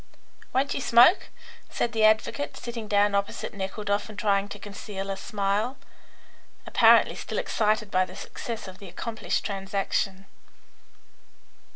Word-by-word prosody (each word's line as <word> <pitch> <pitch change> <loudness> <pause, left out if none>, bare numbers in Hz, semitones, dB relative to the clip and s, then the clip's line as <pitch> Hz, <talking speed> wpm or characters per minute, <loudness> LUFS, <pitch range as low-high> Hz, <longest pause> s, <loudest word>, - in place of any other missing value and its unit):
"Won't 270 +2 +1
you - - -3
smoke?" 245 +10 +5 0.4
said 235 - -1
the 220 -1 0
advocate, 215 -9 +1
sitting 235 -2 -6
down 205 0 +3
opposite 200 0 -2
Nekhludoff 205 +1 -2
and 215 - -10
trying 200 -2 +1
to 205 - -7
conceal 200 -1 -6
a - - -2
smile, 205 +4 -1 0.9
apparently - - +5
still - - -6
excited 215 -1 0
by 185 0 +3
the 185 - -12
success 225 +1 -6
of 185 0 -11
the 200 -3 -10
accomplished 220 +5 -3
transaction. 195 -1 -2
205 Hz, 135 wpm, -26 LUFS, 195-220 Hz, 0.9 s, smoke